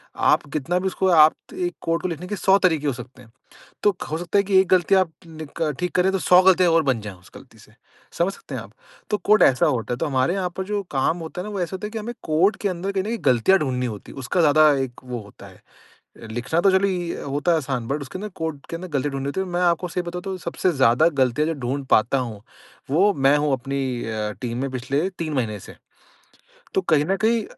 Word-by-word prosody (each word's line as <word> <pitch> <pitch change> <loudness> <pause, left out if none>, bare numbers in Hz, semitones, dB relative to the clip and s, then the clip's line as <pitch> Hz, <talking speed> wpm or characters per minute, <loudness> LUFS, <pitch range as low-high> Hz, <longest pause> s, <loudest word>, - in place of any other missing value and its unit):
आप - - +3
कितना 165 +5 0
भी 190 - -2
उसको 190 0 0
आप 155 -2 +7 0.2
1 355 -1 -2
कोड 165 0 -1
को - - -1
लिखने 175 +1 -6
के 205 - -3
100 195 +1 +4
तरीके 160 -5 +1
हो 135 - +1
सकते 125 +1 -11
हैं। 115 -2 -18 0.5
तो 205 - +3 0.2
हो 155 - -1
सकता 175 +3 0
है 200 - +5
कि 195 -1 +1
एक 190 - 0
गलती 185 +1 +3
आप 185 -3 +3 0.2
नी 160 -1 -9
क 155 -2 +1
ठीक 180 -1 -2
करे 185 +1 +3
तो 195 - 0
100 180 +3 +6
गलतियाँ 185 -2 +5
और 165 0 +4
बन 130 -5 0
जाएँ 105 -3 -8
उस 90 - -20
गलती - - -15
से। - - -19 0.5
समझ 180 +3 +1
सकते - - -10
हैं - - -3
आप? - - -14 0.4
तो 210 - +2
कोड 215 +1 +4
ऐसा 125 -2 +4
होता। 120 -3 -1
तो 165 - -2
हमारे 135 +5 +1
यहाँ 185 -2 -2
पर 190 - -2
जो 205 0 -2
काम 140 +5 +1
होता 165 +2 -6
ना 210 - -7
वो 200 -3 -4
ऐसा 175 +2 -2
होता 210 - -6
है - - -7
कि 225 - -5
हमें 235 +3 -6
कोड 175 +7 +2
के 205 - -2
अंदर 185 +2 -3
कहीं 195 - 0
न - - -6
कहीं 230 +1 -2
गलतियाँ 130 +9 +4
ढूँढ़नी 125 -3 -1
होती 105 -4 -7
उसका 135 +7 -2
ज़्यादा 155 0 +6
एक 125 -2 -7
वो 125 -1 -5
होता 100 -1 -14
है। - - -17 0.7
लिखना 125 +9 -1
तो 195 - +4
चलो 190 +1 +3
इ 175 -3 -2
होता 145 +5 +1
आसान 130 -5 -3
बट 145 +2 -2
उसके 140 +7 -7
अंदर 210 +1 -5
कोड 160 -3 -4
के - - -4
अंदर 185 +2 -6
गलती 145 - -2
ढूँढ़नी 135 0 -4
होती। 190 - -4
मैं 175 +1 -1
आपको 175 0 +1
सही 180 +1 -2
बताता 180 +2 -6
हूँ 190 - -3
सबसे 175 +1 -1
ज़्यादा 135 +2 +4
गलतियाँ 130 +4 +2
जो 165 - 0
ढूँढ़ 135 +3 -2
पाता 115 +5 +4
हूँ 115 -5 -5 0.5
वो 195 +7 +4
मैं 140 -2 +3
हूँ 145 -1 0
अपनी 135 +2 -2 0.2
अ, 110 -1 -3
टीम 120 -1 -3
में 135 - -2
पिछले 135 +8 -1
3 165 -5 -5
महीने 110 -6 -2
से। - - -12 1.0
तो - - +3
कहीं 155 -5 +2
न 195 +3 +1
कहीं 220 +1 +1
160 Hz, 250 wpm, -23 LUFS, 135-185 Hz, 1.0 s, आप